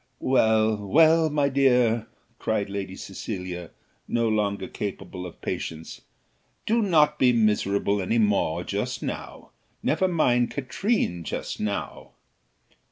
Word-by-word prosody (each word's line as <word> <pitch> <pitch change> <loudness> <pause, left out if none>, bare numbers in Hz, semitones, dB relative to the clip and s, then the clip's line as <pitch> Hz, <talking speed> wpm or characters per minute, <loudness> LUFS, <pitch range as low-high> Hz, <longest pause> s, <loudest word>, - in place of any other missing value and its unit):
"Well, 110 -4 +3
well, 160 +10 +4
my 145 -1 +1
dear," 125 -4 +3 0.3
cried 105 -3 -1
Lady 95 -2 -4
Cecilia, 90 -3 -6 0.4
no 115 -1 +1
longer 100 -3 0
capable 95 -2 -6
of 85 - -13
patience; 80 0 -5 0.6
"do 230 +2 +2
not 150 -7 +3
be 125 -1 +5
miserable 105 -3 +1
any 95 +5 0
more 105 -7 +1
just - - -3
now; - - -6 0.3
never 190 - +2
mind 125 -9 +2
Katrine 130 - -1
just - - -5
now." 105 -1 -4
110 Hz, 115 wpm, -25 LUFS, 100-140 Hz, 0.6 s, be